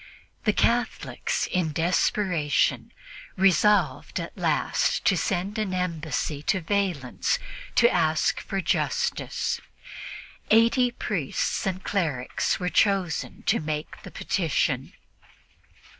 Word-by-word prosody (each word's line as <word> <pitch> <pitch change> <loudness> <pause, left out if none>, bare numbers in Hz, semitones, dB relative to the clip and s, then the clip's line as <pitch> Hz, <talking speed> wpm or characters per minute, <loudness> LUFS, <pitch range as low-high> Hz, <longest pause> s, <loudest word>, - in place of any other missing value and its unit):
The 215 - +5
Catholics, 240 +3 0
in 170 -4 0
desperation, 165 -2 +1 0.4
resolved 195 +2 +3
at - - -6
last - - 0
to - - +4
send 195 +1 -1
an 195 -4 -1
embassy 160 -4 -2
to 190 +5 +1
Valens 185 - 0 0.4
to 235 - +6
ask 160 -6 +1
for 195 - -3
justice, 480 - -1 0.9
eighty 235 +3 +5
priests 195 - -2
and 185 0 -3
clerics 150 -11 -1
being 180 -1 -2
chosen 195 -5 +1
to - - +2
make 155 0 -4
the - - -10
petition. 155 -7 -1
185 Hz, 100 wpm, -26 LUFS, 155-210 Hz, 0.9 s, to